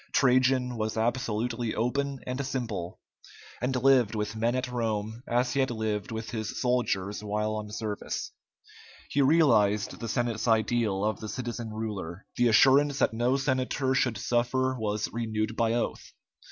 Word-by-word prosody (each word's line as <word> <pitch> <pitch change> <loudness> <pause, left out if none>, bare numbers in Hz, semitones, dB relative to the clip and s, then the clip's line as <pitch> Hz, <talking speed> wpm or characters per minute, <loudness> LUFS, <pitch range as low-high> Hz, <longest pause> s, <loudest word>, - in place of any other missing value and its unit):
Trajan 130 -1 +3
was 110 0 -2
absolutely 115 0 -1
open 135 +4 -1
and 130 +2 -3
simple, 115 -10 -4 0.6
and 130 +1 0
lived 125 -4 +4
with 105 0 -2
men 115 +2 +1
at 130 0 -1
Rome 110 -1 -2
as 120 +1 +1
he 140 - 0
had 135 - +2
lived 110 -3 -2
with 110 -1 -5
his 110 -2 -4
soldiers 105 -6 0
while 105 +1 -1
on 105 -1 -5
service. 105 -2 -4 0.8
He 140 - +2
realized 115 -9 +3
the 115 - -4
Senate's 120 -2 -1
ideal 110 -3 +2
of 110 - -1
the 110 - -6
citizen 120 -2 -4
ruler. 105 -5 -5
The 120 - +3
assurance 135 +5 +5
that - - +2
no 120 +4 +1
senator 130 0 0
should 125 -4 +1
suffer 125 +3 0
was 105 -3 -1
renewed 110 -1 -2
by 115 -1 +1
oath. 120 - -3
115 Hz, 155 wpm, -28 LUFS, 110-130 Hz, 0.8 s, assurance